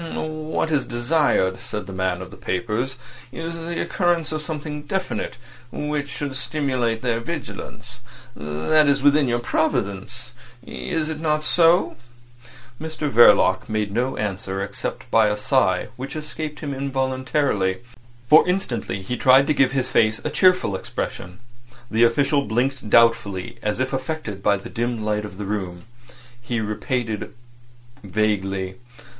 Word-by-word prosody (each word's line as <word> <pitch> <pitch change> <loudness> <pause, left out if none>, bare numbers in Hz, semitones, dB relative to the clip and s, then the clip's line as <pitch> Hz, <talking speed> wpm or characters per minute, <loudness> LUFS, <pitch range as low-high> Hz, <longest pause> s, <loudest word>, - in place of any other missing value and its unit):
"What 155 0 -2
is 145 -4 +1
desired," 120 - +2
said 105 - -5
the 95 - -8
man 95 -1 -1
of 90 - -12
papers, 115 +7 -2 0.4
"is 165 +4 -5
the 165 +1 -4
occurrence 175 -3 0
of 155 -1 -2
something 150 -1 -5
definite 185 +2 -3 0.3
which 150 -1 -3
should 140 -1 -4
stimulate 125 -4 -1
their 120 -2 +1
vigilance. 115 -3 -7 0.4
That 80 - +2
is 140 -1 +2
within 145 -1 +5
your 120 -1 +1
province—is 120 - -3
it 155 -1 -4
not 155 -1 0
so?" 170 +3 +3 0.8
Mr 155 -2 -3
Verloc 110 -4 +6
made 105 -2 -1
no 125 +5 -1
answer 95 -2 -3
except 100 - -4
by 110 -1 +5
a 105 0 0
sigh, 105 -6 +1
which 135 +4 -6
escaped 150 0 -5
him 145 -2 -3
involuntarily, 130 -6 0 0.5
for 155 +7 +7
instantly 120 - -2
he 125 +6 -3
tried 130 +2 +6
to 150 - +2
give 135 -2 +3
his 130 -2 0
face 110 -1 +3
a 155 - -1
cheerful 180 - +3
expression. 90 -1 -5 0.5
The 115 +2 +5
official 140 +4 +2
blinked 125 +1 -1
doubtfully, 115 -2 +3
as 105 +2 -1
if 130 +1 -1
affected 130 -7 -4
by 100 0 +3
the 95 - -9
dim 120 -2 -2
light 105 0 0
of 100 -2 -10
the 105 - -5
room. 95 -4 -4 0.6
He 120 0 -2
repeated 110 +1 -3 0.7
vaguely. 95 -2 -1
125 Hz, 140 wpm, -23 LUFS, 105-150 Hz, 0.8 s, for